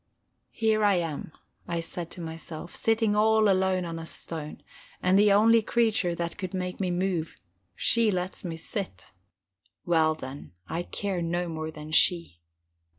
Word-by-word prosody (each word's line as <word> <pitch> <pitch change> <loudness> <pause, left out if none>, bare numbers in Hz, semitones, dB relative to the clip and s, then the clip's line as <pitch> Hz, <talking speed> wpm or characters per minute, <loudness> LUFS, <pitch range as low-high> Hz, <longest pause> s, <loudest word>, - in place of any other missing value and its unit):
Here 220 -1 +1
I 205 -2 +5
am, 165 -3 -3 0.4
I 170 -1 -1
said 170 0 -5
to 175 - -8
myself, 165 +1 -7
sitting 225 -2 +2
all 220 0 +4
alone 190 -1 +2
on 165 -1 -5
a 165 - -7
stone, 155 -3 -6 0.4
and 180 - +2
the 205 0 +5
only 225 +3 +6
creature 220 -5 +1
that 170 +1 -4
could 185 0 -4
make 180 -1 -3
me 190 -2 0
move, 175 -2 -1 0.4
she 230 -2 +4
lets 185 -1 -2
me 170 -3 -4
sit. 165 - -5 0.7
Well, 160 -2 +3
then, 130 - -9
I 165 - -2
care 190 0 -3
no 175 +1 -1
more 160 -1 -4
than 155 0 -9
she. 170 - +3
175 Hz, 155 wpm, -27 LUFS, 165-205 Hz, 0.7 s, only